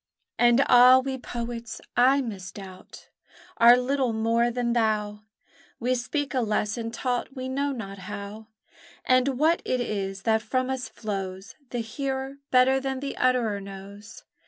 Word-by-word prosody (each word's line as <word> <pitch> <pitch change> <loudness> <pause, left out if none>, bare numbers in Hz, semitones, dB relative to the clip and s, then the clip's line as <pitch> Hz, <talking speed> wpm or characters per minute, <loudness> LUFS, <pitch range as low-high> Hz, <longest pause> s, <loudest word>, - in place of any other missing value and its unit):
And 240 +2 +5
ah, 250 +1 +8
we 265 0 -2
poets, 235 -2 -6 0.2
I 265 +3 +4
misdoubt, 195 -4 -9 0.5
Are 235 +1 +8
little 255 -1 0
more 230 +2 +1
than 240 0 -1
thou! 215 -2 0 0.6
We 250 +2 0
speak 280 +4 -2
a 260 - +1
lesson 215 +1 -1
taught 245 +3 -3
we 260 0 -5
know 280 +2 -1
not 200 -6 -7
how, 205 +3 -8 0.6
And 255 +1 +2
what 320 +4 +3
it 255 - -1
is 195 -4 -3
that 220 -1 +2
from 255 +3 -1
us 260 -1 -4
flows 195 -2 -6 0.2
The 245 - -3
hearer 265 +4 -4
better 260 +1 +4
than 265 -1 -3
the 275 0 -5
utterer 240 -5 +1
knows. 200 +2 -11
240 Hz, 145 wpm, -26 LUFS, 210-260 Hz, 0.6 s, ah